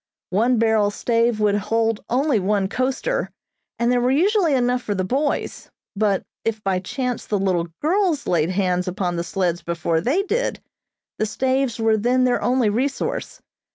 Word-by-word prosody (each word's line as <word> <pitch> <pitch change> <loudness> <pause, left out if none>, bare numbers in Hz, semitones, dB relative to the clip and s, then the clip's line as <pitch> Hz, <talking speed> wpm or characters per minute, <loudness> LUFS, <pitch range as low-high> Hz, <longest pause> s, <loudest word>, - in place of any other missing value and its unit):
One 230 +6 +2
barrel 220 -2 +3
stave 230 +1 +1
would 210 -1 +3
hold 225 +1 0
only 265 -1 +2
one 195 0 +1
coaster, 265 - -1 0.5
and 235 +1 +1
there 245 -1 +2
were 245 - +2
usually 345 +2 +3
enough 250 0 +1
for 205 -4 -3
the 185 - -1
boys, 275 +10 -2 0.3
but 200 -2 +1 0.2
if 225 -1 -1
by 190 -1 +1
chance 250 +6 -4
the 210 - 0
little 185 -3 0 0.2
girls 340 -2 +1
laid 165 -1 +1
hands 185 -1 0
upon 180 -1 -2
the 170 - -2
sleds 175 0 -1
before 170 -1 -1
they 290 - +1
did, 465 +5 -1 0.6
the 215 - +1
staves 260 +1 0
were 225 -1 +3
then 250 +4 +2
their 250 -1 +2
only 250 -2 +2
resource. 255 +7 -2
225 Hz, 165 wpm, -22 LUFS, 195-255 Hz, 0.6 s, barrel